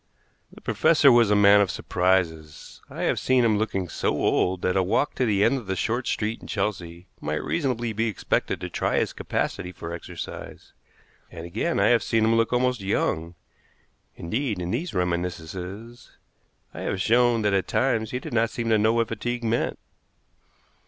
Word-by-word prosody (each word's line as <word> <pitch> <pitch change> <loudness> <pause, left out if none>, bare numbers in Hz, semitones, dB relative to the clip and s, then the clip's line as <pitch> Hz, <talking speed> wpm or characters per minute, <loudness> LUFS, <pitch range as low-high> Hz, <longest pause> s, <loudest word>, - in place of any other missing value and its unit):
The - - -15
professor 150 -4 +4
was 120 -3 +5
a 105 - +4
man 100 0 +6
of 100 - +1
surprises. 85 -6 -1
I - - -5
have - - +1
seen 130 -2 +3
him 110 -2 +2
looking 95 -4 -2
so - - -2
old 90 0 +1
that 90 - +1
a 95 - +3
walk 95 +10 0
to 125 - 0
the 100 -2 +2
end 135 - +3
of 110 - -13
the 95 - -1
short 120 +7 -1
street 110 +1 -2
in - - -11
Chelsea 90 -4 -3
might 75 +1 -3
reasonably 120 -7 -1
be 110 +2 0
expected 110 - -1
to - - -3
try - - 0
his - - 0
capacity 90 - -3
for 85 -1 -7
exercise; 85 - -8 0.6
and, 80 - -9
again, 110 - -1
I - - +4
have 120 -2 +4
seen 115 -2 +1
him 115 - +3
look 115 0 +2
almost 125 -2 +1
young; 85 -3 -1 0.8
indeed, 110 +4 -2
in 90 0 -3
these 155 - -3
reminiscences 90 +5 -4 0.6
I - - -8
have 95 - -3
shown 120 +2 +3
that 105 -1 +2
at 95 -1 +1
times 115 -5 0
he 125 - -3
did 125 - -7
not 115 0 +2
seem 115 0 -3
to 110 -1 +4
know 110 +2 +3
what 115 -1 +1
fatigue 120 +2 -3
meant. 115 +1 0
105 Hz, 185 wpm, -25 LUFS, 90-120 Hz, 0.8 s, man